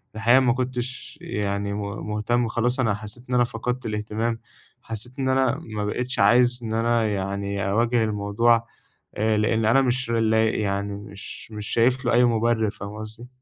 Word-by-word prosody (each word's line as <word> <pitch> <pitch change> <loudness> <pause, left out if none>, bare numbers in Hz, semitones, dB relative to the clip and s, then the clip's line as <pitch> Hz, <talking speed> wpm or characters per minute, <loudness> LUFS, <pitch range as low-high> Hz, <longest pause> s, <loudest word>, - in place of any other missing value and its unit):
الحقيقة، 115 +4 +5
ما 125 -3 +3
كنتش 130 +3 -4
يعني 100 -9 -2
م 105 - -3 0.3
مُهتم. 115 +3 0
خلاص 120 +3 0
أنا 115 -5 +2
حسِّيت 105 +3 -6
إن 125 - 0
أنا 125 - +5
فقدت 125 +1 -3
الاهتمام، 110 +2 -2 0.4
حسِّيت 120 +3 -6
إن 130 -1 0
أنا 130 -1 +2
ما 105 -2 -4
بقيتش 125 +5 -2
عايز 120 +4 +5
إن 110 -1 -3
أنا 115 0 +2
يعني، 100 0 -2
أواجه 115 +3 +2
الموضوع. 110 +2 +2 0.5
آآ، 110 0 +1
لأن 110 +1 +1
أنا 120 +5 +5
مش 125 -1 0
لاق 110 -1 +2
يعني، 100 -1 -1
مش 100 +2 -9
مش 105 -1 -6
شايف 125 +3 +2
له 120 - +2
أي 120 +1 +5
مبرِّر. 115 -1 +2
فاهم 105 -1 -8
قصدي؟ 110 +3 -8
115 Hz, 170 wpm, -24 LUFS, 105-120 Hz, 0.5 s, الحقيقة